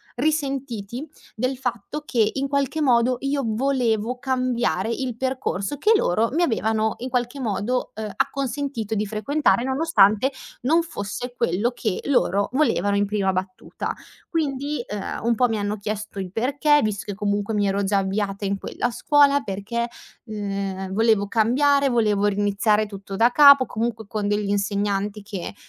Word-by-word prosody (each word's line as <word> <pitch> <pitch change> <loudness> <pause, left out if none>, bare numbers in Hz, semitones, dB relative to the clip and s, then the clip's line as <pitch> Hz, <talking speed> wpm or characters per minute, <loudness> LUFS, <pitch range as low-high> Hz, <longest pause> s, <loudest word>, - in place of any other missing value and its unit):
risentiti 270 -4 -2 0.3
del 255 +4 -2
fatto 245 +3 -4
che 225 -6 +2
in 275 0 -1
qualche 280 +2 -1
modo 250 -2 +3
io 275 +1 0
volevo 240 -1 0
cambiare 250 -6 0
il 245 0 -3
percorso 260 -1 -2
che 425 - +3
loro 225 - +2
mi 340 +3 +2
avevano 220 -5 +1
in 255 +2 -5
qualche 245 +2 -2
modo, 240 +1 -1
ehm, 215 -1 -5
acconsentito 275 -4 -2
di 210 0 -1
frequentare, 235 +5 +1
nonostante 260 -4 +3 0.3
non 320 +7 +3
fosse 245 -4 -5
quello 205 +4 0
che 220 -5 -2
loro 200 -7 +2
volevano 255 -7 +1
in 205 0 +1
prima 200 -2 0
battuta. 185 0 -4 0.4
Quindi, 290 -4 -1
ehm, 205 -1 -5
un 235 +1 +2
po' 245 +2 +3
mi 225 -2 -1
hanno 205 +1 -2
chiesto 210 0 -5
il 185 -2 -5
perché, 285 +7 +2
visto 210 -2 -2
che 205 - -4
comunque 205 +1 -1
mi 205 -1 +2
ero 200 +1 0
già 200 +1 +1
avviata 195 +1 -1
in 195 0 -1
quella 245 - -3
scuola 285 +2 +4
perché, 235 +2 -3 0.4
ehm, 195 -3 -4
volevo 220 -1 +3
cambiare, 275 +6 +3
volevo 210 -4 +2
riniziare 205 +1 +2
tutto 200 -1 -8
da 230 +4 +4
capo, 280 -1 +8
comunque 225 -1 -3
con 210 -1 -2
degli 205 0 0
insegnanti 200 0 -1
che 200 -2 -6
225 Hz, 155 wpm, -23 LUFS, 205-265 Hz, 0.4 s, capo